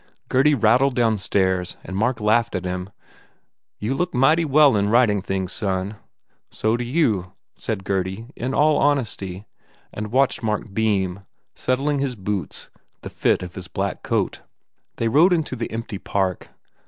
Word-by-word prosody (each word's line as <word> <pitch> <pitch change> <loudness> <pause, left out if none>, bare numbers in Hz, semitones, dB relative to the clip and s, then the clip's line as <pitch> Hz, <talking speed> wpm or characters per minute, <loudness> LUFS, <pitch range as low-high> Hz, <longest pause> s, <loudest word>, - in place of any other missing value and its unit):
Gurdy 145 +3 +4
rattled 125 +3 +3
downstairs 95 -5 +1
and 95 - -7
Mark 115 +4 0
laughed 110 +1 +2
at 90 0 -3
him, 90 +1 -3 0.9
"You 110 +6 -2
look 180 +2 -2
mighty 155 +6 +4
well 145 -3 +5
in 100 0 +1
ridin 110 -3 +4
things, 95 -1 -3
son!" 95 -2 -1
u 105 - -10 0.5
So 110 +1 0
do 120 - -2
you/ 115 - 0 0.2
said 105 -4 -4
Gurdy, 95 +2 -2
in 130 +3 -3
all 150 0 +4
honesty, 110 -9 -1 0.5
and 105 0 -5
watched 135 +2 +2
Mark 105 -2 -2
beam, 100 -4 0 0.3
settling 140 +3 0
his 135 -2 -1
boots, 100 -5 -4 0.3
the - - -7
fit - - +1
of 90 -1 -8
his 95 -2 -8
black 95 +3 -3
coat. - - -1 0.5
They 115 - -1
rode 160 +10 +5
into 160 -6 -1
the 115 -1 -4
empty 115 -3 -5
Park. 95 -3 -2
110 Hz, 155 wpm, -22 LUFS, 95-130 Hz, 0.9 s, well